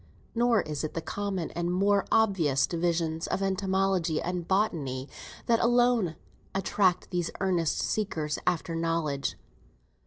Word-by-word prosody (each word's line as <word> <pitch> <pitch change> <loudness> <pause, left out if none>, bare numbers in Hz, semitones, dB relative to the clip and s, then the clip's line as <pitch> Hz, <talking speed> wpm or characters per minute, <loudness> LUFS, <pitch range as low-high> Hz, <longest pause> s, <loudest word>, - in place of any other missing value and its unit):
Nor 235 -2 +3
is 150 -1 -4
it 155 - -4
the - - 0
common 195 -2 -3
and 175 +1 -2
more 200 +2 +2
obvious 180 -11 +3
divisions 165 -1 -1
of 195 - -1
Entomology 190 -3 +1
and 175 -1 -3
Botany 150 -10 0 0.4
that 230 -1 +3
alone 240 -7 +3 0.4
attract 190 -2 +1
these 175 -2 -1
earnest 180 -4 +1
seekers 160 -8 -1
after 165 0 0
knowledge. 165 -4 -1
180 Hz, 125 wpm, -28 LUFS, 165-200 Hz, 0.4 s, Nor